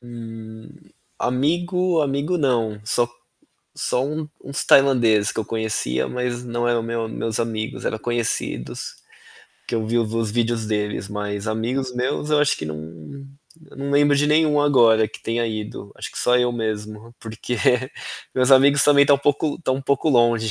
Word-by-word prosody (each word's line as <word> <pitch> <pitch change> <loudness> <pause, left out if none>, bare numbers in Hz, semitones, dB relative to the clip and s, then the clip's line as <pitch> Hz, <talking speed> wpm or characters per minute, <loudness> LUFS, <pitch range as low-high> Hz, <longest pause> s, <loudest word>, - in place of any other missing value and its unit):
Hum, 115 -2 -10 0.5
amigo, 175 +6 +1
amigo 145 +4 0
não, 115 -7 0
só 120 +2 +1 0.7
só 125 - 0
um 155 +1 -4 0.2
uns 140 0 -3
tailandês 120 -7 +4
que - - -4
eu 110 - -3
conhecia 105 - -1
mas 125 -1 -3
não 120 0 -1
era 120 -1 +2
o 115 - -4
meu 115 0 -3
meus 110 0 -3
amigos, 110 -1 -3
era 110 - -2
conhecidos, 120 - -3 0.7
que - - -3
eu 110 -1 -1
vi 115 +2 0
os 115 -1 -1
vídeos 115 -1 0
deles 105 -2 -2
mas 105 0 -4
amigos 125 +4 -2
meus 125 +4 -2
eu 150 - +4
acho 150 - +3
que 80 - -6
não, 75 0 -5 0.9
eu - - -15
não 140 +1 -4
lembro 145 0 +4
de 145 - +2
nenhum 150 -1 +3
agora 115 -6 +4
que - - -12
tenha 115 +1 -1
ido, 105 -2 -6
acho - - -7
que - - -7
só 125 - +3
eu 125 0 +2
mesmo 110 0 -5
porque 115 +2 -5 0.8
meus 130 0 +2
amigos 140 +1 +6
também 140 -1 +6
estão 140 0 +5
um - - -9
pouco 145 +1 +1
estão 130 -6 -1
um 135 - -6
pouco 140 +3 +1
longe, 120 -3 +3
120 Hz, 175 wpm, -22 LUFS, 110-140 Hz, 0.9 s, amigos